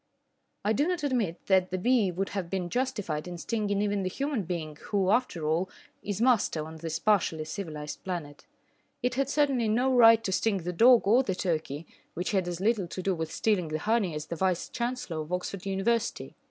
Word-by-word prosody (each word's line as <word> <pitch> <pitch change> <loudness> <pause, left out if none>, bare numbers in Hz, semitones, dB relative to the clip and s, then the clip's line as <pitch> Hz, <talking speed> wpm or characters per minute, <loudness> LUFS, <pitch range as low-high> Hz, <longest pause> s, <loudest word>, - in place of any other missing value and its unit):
I 215 - +3
do 285 +8 +1
not 355 -4 -1
admit 235 - -1
that 185 -1 +3
the 185 - -2
bee 230 0 +3
would 190 +3 -2
have 190 -4 -4
been 180 -2 -3
justified 205 -12 -2
in 175 -1 -6
stinging 205 +1 -1
even 205 -1 0
the 185 - -1
human 275 -2 -2
being 160 -3 -4
who, 195 -2 +1
after 215 -9 0
all, 165 +5 +1 0.3
is 205 -1 -4
master 225 -10 +2
on 160 0 -9
this 160 0 -3
partially 175 -7 +1
civilised 155 -4 -6
planet. 165 -6 -6 0.6
It 250 - +1
had 270 +1 0
certainly 275 -6 +2
no 250 +4 +2
right 230 -2 +7
to 190 - -1
sting 205 +2 +1
the 180 +1 -3
dog 240 +6 +6
or 230 +6 +5
the 195 -8 -2
turkey, 160 -4 -2 0.3
which 180 +2 -2
had 190 -3 +1
as 175 -1 -3
little 205 -2 +1
to 185 +2 -6
do 195 - +1
with 160 -2 -4
stealing 200 -6 +1
the 155 0 -2
honey 205 -1 0
as 150 0 -4
the 170 - -5
Vice 185 0 0
Chancellor 240 -8 -3
of 155 +2 -8
Oxford 180 +1 -3
University. 225 +4 -1
195 Hz, 205 wpm, -28 LUFS, 170-230 Hz, 0.6 s, right